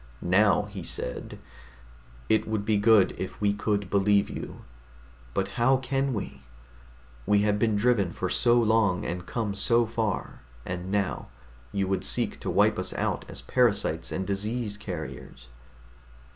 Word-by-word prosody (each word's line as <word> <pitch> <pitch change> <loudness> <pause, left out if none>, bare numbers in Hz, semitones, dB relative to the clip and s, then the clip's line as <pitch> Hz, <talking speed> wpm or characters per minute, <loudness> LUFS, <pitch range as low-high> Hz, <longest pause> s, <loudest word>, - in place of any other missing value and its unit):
Now 100 +4 +4
he 105 -2 -8
said, 60 -6 -4 0.9
"It 110 - +2
would 110 -2 -2
be 110 -1 +2
good 100 -2 +5
if 95 - -5
we 100 -1 +2
could 105 -1 -1
believe 100 0 +3
you. - - -7 0.7
But - - 0
how 130 +3 +4
can 135 +1 -1
we? 70 -9 -6 0.9
We 105 0 +4
have 105 0 +1
been 110 -1 +2
driven 105 -4 +2
for 95 - -3
so 120 +6 +3
long 110 -5 +2
and 90 0 -4
come 110 -4 -2
so 115 +4 +3
far, 110 -3 -3 0.3
and 90 +1 -5
now 100 -1 -1 0.4
you 100 -1 -1
would 95 0 -1
seek - - -1
to - - -4
wipe - - +3
us - - -3
out - - -2
as - - -6
parasites 100 -10 +1
and 95 - -2
disease 105 +3 -2
carriers." 85 - -8
105 Hz, 150 wpm, -27 LUFS, 95-110 Hz, 0.9 s, good